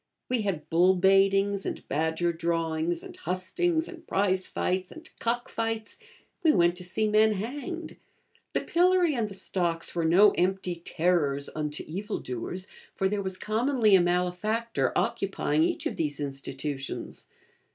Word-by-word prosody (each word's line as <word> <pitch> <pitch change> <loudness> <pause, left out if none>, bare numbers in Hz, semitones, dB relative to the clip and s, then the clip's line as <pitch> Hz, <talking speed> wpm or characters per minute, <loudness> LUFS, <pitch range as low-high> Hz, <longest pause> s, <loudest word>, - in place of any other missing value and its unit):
We 250 -2 +1
had 190 -7 -3
bull 180 +3 +4
baitings, 195 +1 +3
and - - -5
badger 160 +3 0
drawings, 165 0 -1
and - - -10
hustings, 320 - 0
and 335 -2 -11
prize 190 -1 +1
fights, 185 0 -2
and 320 0 -11
cock 240 +1 -1
fights; 225 -1 -3 0.4
we 325 -4 +5
went 175 0 +3
to 180 - -7
see 215 +4 0
men 215 +1 +4
hanged; 290 - -5 0.6
the - - +1
pillory 355 -1 +3
and 230 -5 -1
the 195 - -7
stocks 170 -3 -2
were 170 - -1
no 185 +6 +6
empty 185 -1 0
'terrors 165 -5 0
unto 150 -1 -3
evil 200 +6 -4
doers,' 130 +10 -4 0.3
for 190 - +1
there 205 +1 -1
was 190 -1 -3
commonly 225 +1 +2
a 190 - +7
malefactor 180 +6 0
occupying - - 0
each 335 -2 0
of 315 - -2
these 150 -3 -2
institutions. 140 0 -5
190 Hz, 150 wpm, -28 LUFS, 170-225 Hz, 0.6 s, a